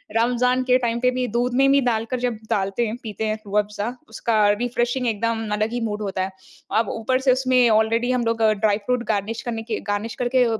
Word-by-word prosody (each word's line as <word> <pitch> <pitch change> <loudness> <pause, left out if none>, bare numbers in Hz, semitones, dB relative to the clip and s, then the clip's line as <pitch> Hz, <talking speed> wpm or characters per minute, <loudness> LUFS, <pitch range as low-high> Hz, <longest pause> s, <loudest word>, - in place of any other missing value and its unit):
रमज़ान 250 +2 +2
के 255 0 +4
टाइम 235 -1 -1
पे 250 +1 +3
भी 255 0 -1
दूध 240 +2 -1
में 270 +1 +4
भी 280 - +5
डालकर 235 +1 0
जब 245 -2 -1
डालते 195 +4 0
हैं 215 - -3
पीते 220 -1 -4
हैं 215 - 0
रूह 205 +1 +1
अफ़ज़ा 210 +1 -2 0.2
उसका 230 -2 -1
अरबी 210 +4 +1
फ्रेशिंग 245 +1 0
एकदम 225 0 -1
अलग 215 +1 0
ही 245 - -1
मूड 210 0 -4
होता 195 -2 -2
है। 190 - -4 0.5
अब 225 - 0
ऊपर 255 +3 0
से 265 -1 +4
उसमें 255 -1 +3
ऑलरेडी 225 +3 +2
हम 250 -2 0
लोग 230 0 0 0.2
ड्राई 210 -2 +3
फ्रूट 250 0 0
गार्निश 215 +2 -1
करने 225 -2 -4
के 225 -1 -3
गार्निश 205 +3 -2
करके 250 +1 +3
230 Hz, 220 wpm, -22 LUFS, 215-250 Hz, 0.5 s, भी